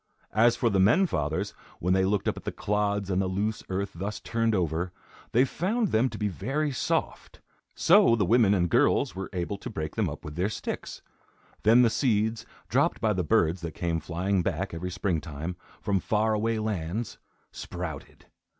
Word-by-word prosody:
As 115 +2 +5
for 115 -1 +1
the 100 - +2
men 115 - +5
fathers, 80 - -2 0.3
when 90 +2 +1
they 95 0 +3
looked 100 +1 0
at - - +2
the - - -3
clods 100 -1 -1
and 95 +1 +2
the 95 - 0
loose 105 +4 -1
earth 95 +1 -2
thus 100 +5 -4
turned 115 -1 0
over, 85 0 -1 0.4
they 125 +3 +4
found 205 - -1
them 115 +4 +2
to - - -7
be 105 - 0
very 135 - -2
soft. 130 - -2 0.4
So 115 - +5
the 105 -4 +1
women 110 0 +4
and 90 -2 +2
girls 85 - +2
were 95 0 -5
able 95 +1 -3
to 125 - -6
break 80 -8 -5
them - - +1
up - - -8
with 75 - -6
their 90 +6 0
sticks. 110 - -5 0.6
Then 115 +4 +6
the 115 - +4
seeds, 110 -3 0 0.2
dropped - - +1
by 110 -1 +2
the 90 -2 -1
birds 85 -3 +2
that 85 -3 -6
came 85 -2 -1
flying 90 +4 -1
back 95 +1 -2
every 85 +2 -4
spring 90 -3 -1
time, 80 +2 -5 0.3
from 100 -2 +1
far 110 +3 +1
away 110 +1 0
lands, 105 0 -3 0.3
sprouted. 85 -5 -7
100 Hz, 185 wpm, -27 LUFS, 90-110 Hz, 0.6 s, Then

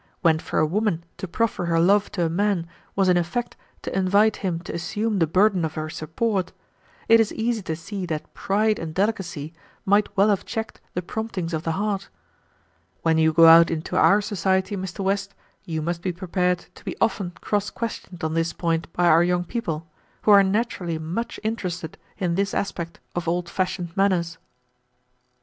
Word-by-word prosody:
When 160 -3 +4
for - - -4
a - - +4
woman 180 0 0
to 190 - -5
proffer 215 0 -1
her 165 -1 +2
love 200 +4 +3
to 175 -3 0
a - - +2
man 195 0 +1 0.3
was 195 -1 +3
in 180 -1 +5
effect 175 +8 -2 0.3
to - - -4
invite 200 +3 +3
him 180 -4 -2
to - - -7
assume 205 +5 -1
the 165 - +3
burden 185 +2 +3
of 160 -1 -2
her 155 0 -4
support, 185 +5 -1 0.6
it 230 0 +7
is 225 -2 +2
easy 230 0 -1
to 160 -4 -3
see 190 +3 -6
that 155 -2 -5
pride 215 +2 +1
and 160 -1 -6
delicacy 185 -7 -1 0.3
might 205 +1 +3
well 200 +2 +5
have 200 -2 +1
checked 220 0 -5
the 180 - -1
promptings 185 -4 -4
of 160 - -1
the 165 0 -1
heart. 200 +1 -2 0.9
When 160 -1 +3
you 160 0 +4
go 165 +1 +6
out 165 0 +9
into 160 +1 -3
our 205 +2 +5
society, 190 -1 0
Mr. 190 +1 -5
West, 195 +1 -1 0.3
you 160 -2 -3
must 170 +1 -2
be 185 - -1
prepared 180 0 -1
to - - -16
be - - -5
often 200 -5 0
cross 205 0 -1
questioned 215 -7 -6
on 160 0 -1
this 165 0 0
point 165 0 -1
by 175 - +1
our 165 -1 +6
young 175 0 +1
people, 165 -6 -3 0.4
who 215 - +4
are 200 -1 +9
naturally 195 -4 -1
much 170 +9 -4
interested 185 -7 -3 0.2
in 180 -3 0
this 200 +3 0
aspect 170 -4 -3 0.2
of 175 -1 -3
old 175 +1 0
fashioned 180 -2 -2
manners." 175 -4 +1
180 Hz, 185 wpm, -24 LUFS, 165-205 Hz, 0.9 s, out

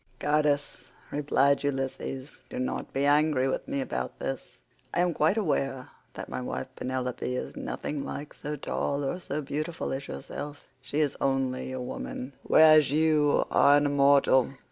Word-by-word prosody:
"Goddess," 145 -3 0 0.2
replied 140 -1 +2
Ulysses, 135 0 -3
"do - - -6
not 130 - -3
be 140 +1 0
angry 145 -2 +3
with 130 - -2
me 140 - -1
about 65 - -4
this. - - -5 0.4
I 175 - +3
am 175 -1 +2
quite 160 +8 +2
aware 135 - -1 0.3
that - - -6
my - - -4
wife 65 +1 -3
Penelope 125 -1 -3
is - - -5
nothing 145 -2 -4
like 145 +1 -6
so 150 0 -5
tall 145 0 -2
or 155 +7 -2
so 150 -4 -4
beautiful 155 +4 -3
as 140 +1 -5
yourself. 145 0 -7 0.2
She 140 +3 -1
is 145 -3 0
only 135 -1 0
a 130 - -4
woman, 125 +1 -5
whereas 155 -2 +6
you 150 -1 +3
are 145 +1 +6
an 145 - +2
immortal. 140 -2 +4
140 Hz, 160 wpm, -28 LUFS, 130-150 Hz, 0.4 s, whereas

